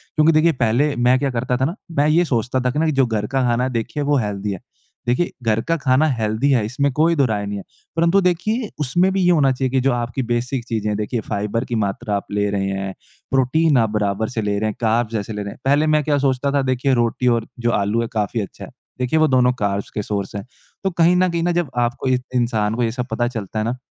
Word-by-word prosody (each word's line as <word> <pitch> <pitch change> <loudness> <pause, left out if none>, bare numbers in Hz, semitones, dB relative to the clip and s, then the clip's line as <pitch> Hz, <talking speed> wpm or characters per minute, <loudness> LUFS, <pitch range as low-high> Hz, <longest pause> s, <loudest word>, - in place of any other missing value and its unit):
क्योंकि 155 +1 +5
देखिए 155 +2 +4
पहले 125 +6 +2
मैं 125 +2 +3
क्या 140 - 0
करता 125 +1 -1
था 130 - +1
ना 165 +6 -2 0.2
मैं 145 +1 +4
ये 170 +3 +4
सोचता 125 -2 0
था 125 0 0
कि 160 0 +2
जो 135 -2 +3
घर 105 -2 -2
का 135 +2 0
खाना 120 0 +1
है 130 - 0
देखिए 120 +5 -2
वो 145 0 +2
हेल्दी 105 -3 -2
है। 95 - -7 0.5
देखिए 125 +9 +1
घर 110 0 +1
का 165 - +3
खाना 135 +1 +2
हेल्दी 110 +6 0
है 120 -6 +2
इसमें 140 +6 0
कोई 165 +3 +3
दोहराय 110 -8 +1
नहीं 100 0 -4
है। 100 - -7 0.3
परंतु 170 +4 +3
देखिए 210 +6 0
उसमें 175 +7 +2
भी 195 - +1
ये 175 - +4
होना 145 -5 +4
चाहिए 130 0 -1
की 135 - +2
जो 135 - +2
आपकी 120 +2 -2
बेसिक 125 +1 -2
चीज़ें 110 -2 -2
है 105 - 0
देखिए 110 +3 -2
फ़ाइबर 105 +3 -1
की 120 - -3
मात्रा 100 +1 -3
आप 100 - -3
ले 105 0 0
रहे 95 -1 -1
हैं। 95 0 -3 0.4
प्रोटीन 135 +3 +3
आप 115 -2 +3
बराबर 105 0 -1
से 115 -3 -3
ले 105 -1 -1
रहे 110 0 0
हैं, - - -5
कार्ब्स 115 0 +1
ऐसे 105 +1 -3
ले 105 - -4
रहे 100 - -6
हैं। - - -13
पहले 145 +3 +3
मैं 155 -1 +3
क्या 145 0 +1
सोचता 135 0 +1
था 140 0 +2
देखिए 130 +1 +1
रोटी 120 +1 +1
और 115 -2 +2
जो 120 0 +1
आलू 105 +4 0
है 115 - -2
काफ़ी 110 +1 -1
अच्छा 100 - -8
है। - - -14 0.3
देखिए 125 +5 +1
वो 155 - +4
दोनों 125 -2 +3
कार्ब्स 100 -1 -1
के 105 - -3
सोर्स 100 -1 -4
है। 100 - -5 0.4
तो 195 - +2
कहीं 170 +1 +3
न 185 0 +3
कहीं 170 -1 -1
न 175 - +2
जब 170 -5 0
आपको 120 +2 0
एक 125 -1 +1
इंसान 110 -3 +1
को 120 - 0
ये 115 - 0
सब 125 +1 -3
पता 120 +1 0
चलता 110 -3 -4
है 110 - -1
ना 120 +2 -2
125 Hz, 260 wpm, -20 LUFS, 110-145 Hz, 0.5 s, क्योंकि